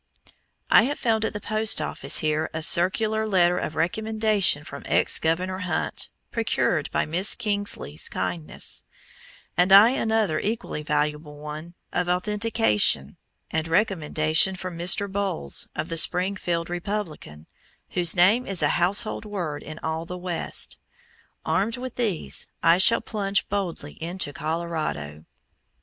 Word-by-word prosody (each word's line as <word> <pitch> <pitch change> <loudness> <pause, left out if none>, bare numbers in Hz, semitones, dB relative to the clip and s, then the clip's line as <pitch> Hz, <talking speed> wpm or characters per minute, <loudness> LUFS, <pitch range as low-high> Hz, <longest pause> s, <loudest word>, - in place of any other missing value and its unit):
I 225 - +7
have 285 +3 -2
found 220 -2 +1
at - - -2
the 205 - -4
post 215 +1 +2
office - - 0
here 155 +1 0
a 160 - -2
circular 220 +7 +2
letter 180 -3 +3
of 155 - -4
recommendation 215 -2 +1
from 140 -1 -8
ex - - +2
Governor 180 +4 -1
Hunt, 185 -2 -2 0.2
procured 200 -9 0
by - - 0
Miss 175 +6 +1
Kingsley's 205 - -2
kindness, 90 -4 -2 0.7
and 180 +2 +3
another 220 -3 +5
equally 220 -7 -3
valuable 150 0 -2
one 155 +3 -8 0.2
of 175 0 0
"authentication" 185 - +1 0.3
and 160 0 -1
recommendation 165 -2 +2
from 185 -2 -6
Mr. 175 +4 +2
Bowles, 190 - -2
of 155 +1 -3
the 165 - -2
Springfield 175 -1 +1
Republican, 175 - -5 0.5
whose 175 0 +4
name 200 +8 +4
is 190 -5 +2
a 145 - +3
household 200 +5 +1
word 180 -9 -4
in 155 0 -9
all 160 +1 -3
the 180 - -6
West. 180 -2 -2 0.7
Armed 225 +5 0
with 255 0 -6
these, 195 - -1 0.2
I 170 +2 +5
shall 230 +5 +6
plunge 200 -2 -1
boldly 180 -8 -4
into 170 -3 -4
Colorado. 155 - -4
180 Hz, 130 wpm, -25 LUFS, 155-205 Hz, 0.7 s, I